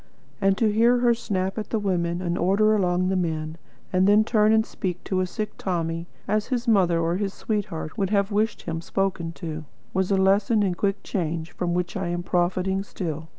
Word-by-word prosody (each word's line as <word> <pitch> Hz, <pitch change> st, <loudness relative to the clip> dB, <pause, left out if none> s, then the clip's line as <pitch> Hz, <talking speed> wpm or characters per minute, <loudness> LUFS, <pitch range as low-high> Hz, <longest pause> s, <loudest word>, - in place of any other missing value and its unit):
And 195 Hz, 0 st, +3 dB
to 220 Hz, -2 st, +3 dB
hear 235 Hz, +3 st, +4 dB
her 240 Hz, -1 st, +4 dB
snap 195 Hz, -3 st, -2 dB
at 215 Hz, -, -5 dB
the 225 Hz, -, 0 dB
women, 180 Hz, -3 st, -1 dB
and 175 Hz, -1 st, -1 dB
order 200 Hz, +5 st, +3 dB
along 185 Hz, -2 st, +1 dB
the 190 Hz, -, +1 dB
men; 160 Hz, -2 st, -2 dB, 0.3 s
and 185 Hz, +1 st, +4 dB
then 210 Hz, +1 st, +6 dB
turn 215 Hz, -1 st, +3 dB
and 220 Hz, 0 st, +4 dB
speak 180 Hz, -3 st, -4 dB
to 190 Hz, -2 st, -1 dB
a 185 Hz, -, +1 dB
sick 210 Hz, +3 st, -4 dB
Tommy 165 Hz, -2 st, -2 dB, 0.2 s
as 210 Hz, +1 st, 0 dB
his 245 Hz, -2 st, -2 dB
mother 185 Hz, -6 st, +4 dB
or 165 Hz, +2 st, 0 dB
his 200 Hz, -1 st, -2 dB
sweetheart 205 Hz, -4 st, -3 dB
would 195 Hz, -2 st, +1 dB
have 200 Hz, 0 st, +1 dB
wished 210 Hz, +1 st, 0 dB
to -, -, -21 dB
hear 165 Hz, -, -3 dB
him 165 Hz, -, -3 dB
spoken 185 Hz, -2 st, -1 dB
to, 160 Hz, -3 st, -6 dB, 0.3 s
was 190 Hz, 0 st, 0 dB
a 195 Hz, -, +3 dB
lesson 200 Hz, +3 st, +3 dB
in 190 Hz, -3 st, +1 dB
quick 195 Hz, +2 st, -1 dB
change 165 Hz, -3 st, -3 dB
from 175 Hz, -1 st, -2 dB
which 180 Hz, -1 st, -2 dB
I 190 Hz, -2 st, -2 dB
am 175 Hz, 0 st, -2 dB
profiting 185 Hz, +2 st, 0 dB
still. 160 Hz, -5 st, -5 dB
190 Hz, 215 wpm, -25 LUFS, 175-210 Hz, 0.3 s, then